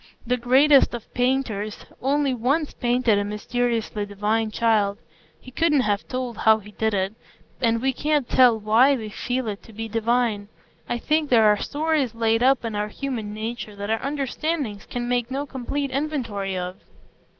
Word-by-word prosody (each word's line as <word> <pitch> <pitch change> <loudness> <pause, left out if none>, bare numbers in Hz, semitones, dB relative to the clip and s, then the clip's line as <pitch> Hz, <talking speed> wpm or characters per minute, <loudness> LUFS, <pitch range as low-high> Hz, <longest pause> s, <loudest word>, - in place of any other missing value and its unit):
The 250 +1 +1
greatest 265 +3 +4
of 235 - -10
painters 245 -5 -1 0.2
only 275 +1 +1
once 275 +6 0
painted 240 -3 +2
a - - 0
mysteriously 220 +1 -2
divine 210 +2 -1
child; 215 -2 +1 0.4
he 255 - -13
couldn't 300 0 +2
have 205 -3 -1
told 255 -2 -4
how 220 0 +5
he 210 -1 -12
did 220 0 -1
it, 190 +1 -1 0.5
and 230 -1 +1
we 265 0 +2
can't 295 -1 0
tell 245 -3 +5
why 230 +7 +4
we 220 -4 -5
feel 245 +3 -3
it 205 -1 -4
to - - -15
be 225 +2 -5
divine. 225 -2 0 0.4
I 240 - 0
think 305 +4 0
there 230 -3 +5
are 210 -1 +5
stores 295 -5 0
laid 225 0 +1
up 260 -1 +3
in 225 - -3
our 210 0 -1
human 225 -2 -4
nature 220 -1 -5
that 205 +1 -4
our 225 - 0
understandings 280 -4 -3
can 240 -1 -4
make 245 -1 0
no 275 +2 -3
complete 275 +1 -3
inventory 245 -10 -2
of. 180 +1 -4
235 Hz, 170 wpm, -24 LUFS, 215-265 Hz, 0.5 s, how